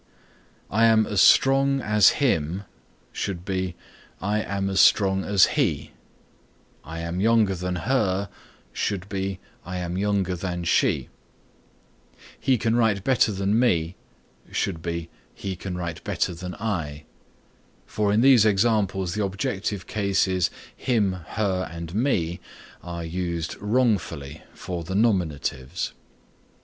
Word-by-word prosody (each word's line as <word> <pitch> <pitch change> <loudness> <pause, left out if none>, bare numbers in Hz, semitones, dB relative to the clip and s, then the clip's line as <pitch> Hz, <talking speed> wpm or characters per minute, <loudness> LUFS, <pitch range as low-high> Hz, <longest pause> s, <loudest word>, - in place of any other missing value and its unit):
"I 115 +3 +4
am 110 -1 +4
as 105 -2 +1
strong 135 0 +5
as 105 -4 +5
him" 95 - 0 0.5
should 90 -3 -4
be 95 -2 -2 0.4
"I 105 +2 0
am 100 -1 -2
as 95 -1 0
strong 95 -2 +4
as 100 -2 +5 0.2
he"; 80 - -1 0.9
"I 80 +3 -7
am 85 +2 -3
younger 110 -1 +3
than 90 0 -3
her" 100 -3 0 0.5
should 95 -2 -2
be 95 -1 -3 0.3
"I 90 +2 -5
am 90 +1 -3
younger 100 -3 0
than 90 0 -4
she;" - - +1 1.3
"He 130 -2 +2
can 115 0 0
write 110 -5 +2
better 125 -3 +3
than 100 +2 +1
me" 90 -8 +1 0.6
should 80 - -2
be 85 0 -4 0.2
"He 95 -1 -4
can 90 0 -6
write 85 -3 -5
better - - -1
than 90 +1 -7
I," 80 -9 -3 0.8
for 105 -1 0
in 105 +2 +3
these 130 -4 +7
examples 100 -4 +1
the 105 - -1
objective 100 0 -3
cases 95 -3 +1 0.3
him, 110 -7 +1
her 95 +1 -2
and 85 0 -7
me 95 -7 0 0.4
are 85 -1 -6
used 85 -1 -3
wrongfully 105 - 0
for 90 -2 -5
the 95 +3 -5
nominatives. 85 - 0
95 Hz, 130 wpm, -24 LUFS, 85-105 Hz, 1.3 s, these